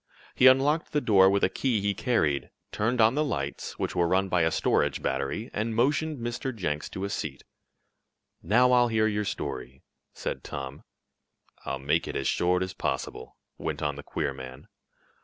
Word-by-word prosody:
He 130 - +6
unlocked 145 +6 +4
the 150 - +3
door 95 -7 +5
with 100 0 +1
a - - +6
key 125 -5 0
he 100 0 0
carried, 90 - 0 0.2
turned 115 +4 0
on 110 +1 +5
the 150 +2 +1
lights, 70 - -4
which - - -3
were 85 -1 +2
run 95 +2 +1
by 90 -1 +2
a 80 - +3
storage - - +1
battery, 70 - -2
and 110 +1 -2
motioned 145 +5 +1
Mr. 120 +2 -4
Jenks 75 -7 -3
to 95 - -6
a 100 - -2
seat. 70 -8 -4 1.0
"Now 125 +4 +4
I'll 125 -1 +5
hear 110 -1 +2
your 105 -1 0
story," 65 - -5 0.3
said - - -5
Tom. 70 0 -6 0.8
"I'll 65 - -2
make 70 +2 0
it - - -5
as 65 - -1
short 90 +1 +2
as 95 0 -5
possible," 65 - -4 0.2
went - - -3
on 75 -2 -1
the 70 - -7
queer 70 -1 -3
man. 65 0 -10
100 Hz, 180 wpm, -27 LUFS, 75-120 Hz, 1.0 s, He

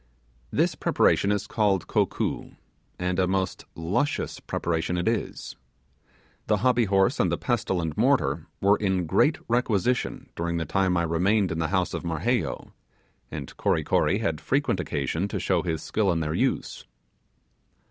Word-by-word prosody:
This - - +1
preparation 100 - +2
is 105 -1 0
called 100 -5 +1
'kokoo', - - -1 0.4
and 90 +1 -1
a 90 - +3
most 95 0 -1
luscious 100 - -1
preparation 85 +1 -2
it 85 - -1
is. 115 0 -2 0.9
The - - +3
hobby 125 -2 +4
horse 95 -1 +2
and - - +2
the - - 0
pestle 95 - -1
and 80 -3 -3
mortar - - +1
were 100 +1 +4
in 95 -3 0
great 150 - +3
requisition 120 0 0
during 85 0 -2
the 80 - -2
time 95 +2 +1
I 85 - +2
remained 90 +4 +2
in 80 - -2
the 80 - 0
house 90 +1 0
of - - -4
Marheyo, 85 +9 -1 0.6
and - - -7
Kory - - +1
Kory 95 - +2
had 80 -8 -2
frequent 135 - 0
occasion 80 +7 -1
to - - -3
show 90 -3 +1
his 80 -3 -3
skill 105 -3 +1
in 85 - 0
their 75 -1 -2
use. - - -1
95 Hz, 155 wpm, -26 LUFS, 85-105 Hz, 0.9 s, hobby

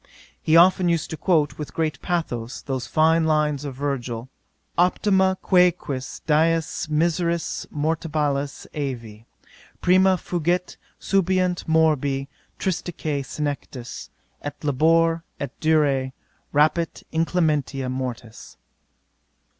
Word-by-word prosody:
'He 160 +1 +4
often 180 +1 +5
used 170 -3 0
to - - -2
quote, 155 -2 +1
with 150 - -6
great 155 -4 -1
pathos, 130 -9 -3
those 130 -3 -3
fine 160 +1 +3
lines 150 -2 +1
of 135 -3 -5
Virgil: 130 -3 -3 0.5
'Optima 190 +1 +3
quaeque 180 -7 +2 0.2
dies 160 +1 +1
miseris 170 +2 0
mortalibus 150 -2 -1
aevi 115 -7 -5 0.5
Prima 185 +1 +4
fugit; 175 +1 -1 0.2
subeunt 185 -2 +1
morbi, 145 -4 +2 0.3
tristisque 160 -5 -2
senectus, 140 -4 -5 0.3
Et 145 -1 -5
labor, 165 +3 +3 0.2
et 140 -3 -4
durae 145 -5 +2 0.4
rapit 155 +3 +1
inclementia 155 -5 0
mortis.' 125 -3 -6
155 Hz, 100 wpm, -23 LUFS, 140-170 Hz, 0.5 s, often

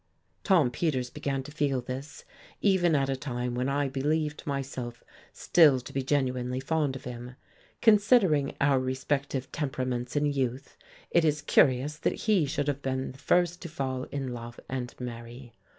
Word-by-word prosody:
Tom 170 - +4
Peters 130 -4 -1
began 135 -1 -2
to 145 - -10
feel 145 -3 0
this, 130 +4 -7 0.3
even 180 -5 +3
at 135 -1 +2
a 135 - 0
time 125 -3 -3
when 125 +2 -1
I 140 0 +1
believed 150 +3 -1
myself 130 -4 -4 0.3
still 150 -6 +5
to 125 - -11
be 135 - 0
genuinely 130 -2 0
fond 145 0 0
of 135 - -8
him. 125 0 -7 0.5
Considering 205 - +4
our 140 -1 +3
respective 130 +1 -2
temperaments 130 -4 -3
in 145 0 +2
youth, 135 -2 -2 0.4
it 170 - +4
is 150 -1 +1
curious 140 +1 +3
that - - -1
he 200 -9 +3
should 145 +1 -2
have 145 -1 -1
been 130 -1 -2
the 130 - -15
first 175 +3 +2
to 170 - -6
fall 130 -4 -3
in 135 -3 -4
love 120 0 -8
and 125 -2 -4
marry. 120 0 -8
135 Hz, 165 wpm, -28 LUFS, 130-150 Hz, 0.5 s, still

